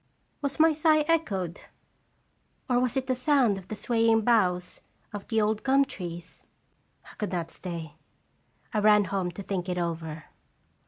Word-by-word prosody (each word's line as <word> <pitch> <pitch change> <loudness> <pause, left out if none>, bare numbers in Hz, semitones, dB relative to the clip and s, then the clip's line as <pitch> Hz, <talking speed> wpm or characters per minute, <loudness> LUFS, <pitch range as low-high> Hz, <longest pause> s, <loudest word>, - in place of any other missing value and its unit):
Was 280 +1 -3
my 320 0 +6
sigh 310 0 +4
echoed, 200 - 0 1.1
or 245 -2 +2
was 250 0 0
it 265 - 0
the 260 - +1
sound 255 -6 +2
of 185 - -15
the 215 - -5
swaying 225 0 +2
boughs 185 -6 +1 0.3
of 205 -1 -7
the 225 - +1
old 215 0 +1
gum 275 +1 +3
trees? 175 -7 -8 0.6
I - - -14
could 210 -3 -2
not 170 -3 -3
stay. 165 -4 -7 0.8
I 215 - +2
ran 210 0 +5
home 190 -2 -2
to 200 - -7
think 185 -2 -3
it 180 - -2
over. 165 -2 -3
210 Hz, 160 wpm, -27 LUFS, 180-255 Hz, 1.1 s, my